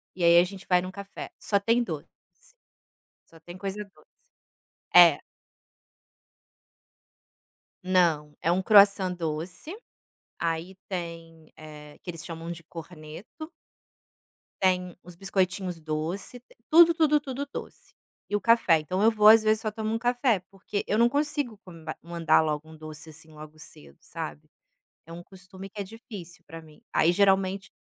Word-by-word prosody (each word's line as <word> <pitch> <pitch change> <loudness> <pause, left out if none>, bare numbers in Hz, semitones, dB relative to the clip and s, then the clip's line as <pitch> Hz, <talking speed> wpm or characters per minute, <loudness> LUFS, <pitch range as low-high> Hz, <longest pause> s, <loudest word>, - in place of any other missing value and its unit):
E 180 - -4
aí 170 0 +6
a - - +5
gente 195 +1 -8
vai 180 -1 +3
num 185 - -6
café, 200 +1 -9
só 200 - +1
tem 230 +4 +2
doce. 160 -9 -6 1.2
Só 165 - -19
tem 175 +2 -11
coisa 200 +2 -5
doce. 200 - -25 0.9
É. - - +8 2.6
Não, 170 -5 +1
é 170 - +1
um 185 - +1
croissant 200 -2 +5
doce, 170 - -5 0.6
aí 170 +3 -3
tem 165 -3 -7
eh, 150 -1 -12
que 180 - -9
eles 165 -1 -7
chamam 165 0 -7
de 170 0 -9
corneto. 165 - -11 1.1
Tem 180 -2 +1
os 180 -1 -13
biscoitinhos 185 -2 -2
doce, 160 +9 -4
t 245 - -25
tudo, 335 +1 +7
tudo, 310 -2 +3
tudo 280 0 -5
doce, - - -9 0.4
e 205 - -1
o 205 - 0
café, 230 -9 +4
então 185 +6 -2
eu 225 - +6
vou 210 -1 +4
às 220 0 +8
vezes 215 0 +2
só 215 - -2
tomo 220 +1 -3
um 225 - -1
café, 245 -2 +1
porque 200 +1 -5
eu 210 - +1
não 235 +1 +5
consigo 285 -6 -2
come 170 -3 -13 0.2
mandar 170 -1 +2
logo 155 -1 -2
um 160 - -13
doce 155 0 -10
assim 160 +1 -14
logo 155 0 -12
cedo, 150 - -14
sabe. 75 0 -8 0.6
É 165 - -11
um 170 - -8
costume 190 +1 -12
que 205 +1 -11
é - - -1
difícil 195 -4 -11
para 165 +2 -9
mim, 155 -1 -18
aí 165 - +3
geralmente 195 0 +2
185 Hz, 155 wpm, -27 LUFS, 165-205 Hz, 2.6 s, É